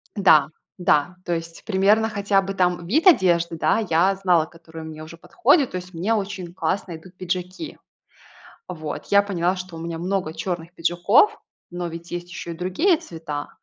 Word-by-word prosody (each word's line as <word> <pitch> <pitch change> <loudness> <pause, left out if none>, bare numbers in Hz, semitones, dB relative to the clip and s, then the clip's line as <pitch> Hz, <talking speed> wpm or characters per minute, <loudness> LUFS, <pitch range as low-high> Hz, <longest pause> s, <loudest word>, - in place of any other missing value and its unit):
Да, 155 -8 +5 0.3
да. 175 -1 +2
То 175 - -1
есть 165 0 -7
примерно 210 +2 +3
хотя 200 -2 +1
бы 195 0 -4
там 180 -2 0
вид 310 - +2
одежды, 170 - +4
да, 190 - +2
я 180 +4 +3
знала, 180 -4 +2
которая 165 -1 -12
мне 155 0 -8
уже 165 +1 -11
подходит. 295 - +2
То 185 - -3
есть 180 0 -9
мне 190 +7 0
очень 195 -4 -3
классно 185 -2 -2
идут 180 +3 -16
пиджаки. 185 - -4 0.9
Вот. 155 -4 -6
Я 200 0 +5
поняла, 185 -2 0
что 185 -2 -8
у - - -7
меня 165 0 -5
много 180 -2 -2
черных 170 0 -4
пиджаков, 175 - +3 0.3
но 175 0 -4
ведь 170 0 -9
есть 175 0 -5
еще 170 -1 -7
и 165 - -8
другие 250 - +2
цвета. 155 - -6
180 Hz, 175 wpm, -23 LUFS, 165-195 Hz, 0.9 s, Да